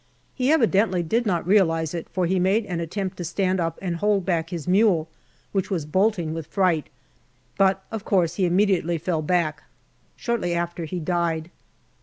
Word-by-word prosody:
He 260 Hz, +2 st, +1 dB
evidently 210 Hz, -, +3 dB
did 225 Hz, +8 st, 0 dB
not 175 Hz, -5 st, 0 dB
realize 165 Hz, -5 st, +2 dB
it, 170 Hz, -2 st, -5 dB
for 185 Hz, -2 st, -1 dB
he 185 Hz, +2 st, +1 dB
made 195 Hz, +5 st, +2 dB
an 175 Hz, -4 st, -3 dB
attempt 185 Hz, +3 st, -4 dB
to 175 Hz, -, -4 dB
stand 185 Hz, +2 st, 0 dB
up 165 Hz, -1 st, -1 dB
and 175 Hz, -3 st, -2 dB
hold 205 Hz, 0 st, +1 dB
back 165 Hz, -3 st, 0 dB
his 170 Hz, -3 st, -5 dB
mule, 185 Hz, -4 st, +3 dB, 0.4 s
which 195 Hz, -2 st, -1 dB
was 175 Hz, -7 st, -2 dB
bolting 185 Hz, -1 st, +1 dB
with 165 Hz, -2 st, -5 dB
fright, 180 Hz, -5 st, +1 dB, 0.7 s
but, 195 Hz, -1 st, +2 dB
of 225 Hz, -3 st, -4 dB
course, 180 Hz, -6 st, +2 dB
he 185 Hz, +1 st, +1 dB
immediately 180 Hz, -2 st, +2 dB
fell 165 Hz, 0 st, -1 dB
back. 155 Hz, -2 st, 0 dB, 0.6 s
Shortly 215 Hz, -8 st, -1 dB
after, 170 Hz, 0 st, -3 dB
he 180 Hz, +3 st, -4 dB
died. 170 Hz, -1 st, -1 dB
180 Hz, 175 wpm, -24 LUFS, 165-195 Hz, 0.7 s, evidently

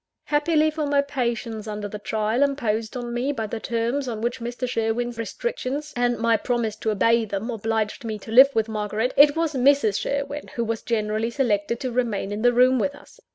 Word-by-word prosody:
Happily 310 Hz, +1 st, +2 dB
for 305 Hz, -1 st, -2 dB
my 285 Hz, 0 st, +3 dB
patience 235 Hz, -5 st, -3 dB
under 210 Hz, -1 st, -4 dB
the 210 Hz, +1 st, -7 dB
trial 220 Hz, +3 st, -1 dB
imposed 235 Hz, -5 st, 0 dB
on 240 Hz, -1 st, -5 dB
me 250 Hz, +4 st, 0 dB
by 225 Hz, -6 st, -3 dB
the 220 Hz, +2 st, -5 dB
terms 235 Hz, +5 st, -1 dB
on 225 Hz, -3 st, -3 dB
which 240 Hz, +2 st, -2 dB
Mr. 240 Hz, +2 st, -4 dB
Sherwin's 235 Hz, 0 st, -1 dB
restrictions, 300 Hz, -, -4 dB
and 245 Hz, 0 st, +1 dB
my 230 Hz, 0 st, +2 dB
promise 230 Hz, -1 st, -1 dB
to 220 Hz, -, -2 dB
obey 230 Hz, +2 st, +3 dB
them, 210 Hz, +3 st, -4 dB
obliged 220 Hz, 0 st, -2 dB
me 220 Hz, -2 st, -3 dB
to 215 Hz, +2 st, -11 dB
live 265 Hz, +4 st, +8 dB
with 220 Hz, -1 st, +2 dB
Margaret, 215 Hz, +3 st, -2 dB
it 290 Hz, 0 st, +7 dB
was 325 Hz, -1 st, 0 dB
Mrs. 255 Hz, -6 st, +3 dB
Sherwin 280 Hz, +5 st, -3 dB
who 235 Hz, -, 0 dB
was 225 Hz, 0 st, -2 dB
generally 220 Hz, 0 st, -1 dB
selected 235 Hz, -3 st, 0 dB
to 255 Hz, -, -2 dB
remain 230 Hz, -5 st, -1 dB
in 205 Hz, +1 st, -3 dB
the 245 Hz, +1 st, +5 dB
room 255 Hz, +1 st, +4 dB
with 280 Hz, +5 st, -1 dB
us. -, -, -17 dB
235 Hz, 200 wpm, -24 LUFS, 220-270 Hz, -, live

